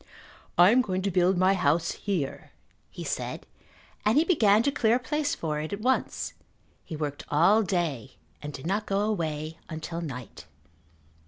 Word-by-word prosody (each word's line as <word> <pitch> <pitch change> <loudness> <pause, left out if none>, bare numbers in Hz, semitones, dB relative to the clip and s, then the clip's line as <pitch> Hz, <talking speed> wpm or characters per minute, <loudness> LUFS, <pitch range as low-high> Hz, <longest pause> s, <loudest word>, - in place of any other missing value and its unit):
"I 175 +3 +8
am 255 +2 +5
going 190 -5 -2
to 200 - 0
build 180 +1 +3
my 185 +2 +4
house 165 -2 +1
here," 180 -10 -3 0.4
he - - -8
said, - - -4 0.6
and 215 +5 +3
he 310 - +6
began 220 - +4
to 280 - +2
clear 230 -4 +2
a - - +1
place 295 +4 -1
for 150 -2 -3
it 155 +1 -5
at 200 - -3
once. 260 +3 0 0.5
He 160 - -7
worked 150 -1 -4
all 175 +9 +5
day 165 - -2 0.3
and 150 - -6
did 140 0 -9
not 200 +4 -1
go 195 0 +1
away 160 -6 -2
until 160 +1 -5
night. 125 - -8
180 Hz, 170 wpm, -27 LUFS, 155-215 Hz, 0.6 s, I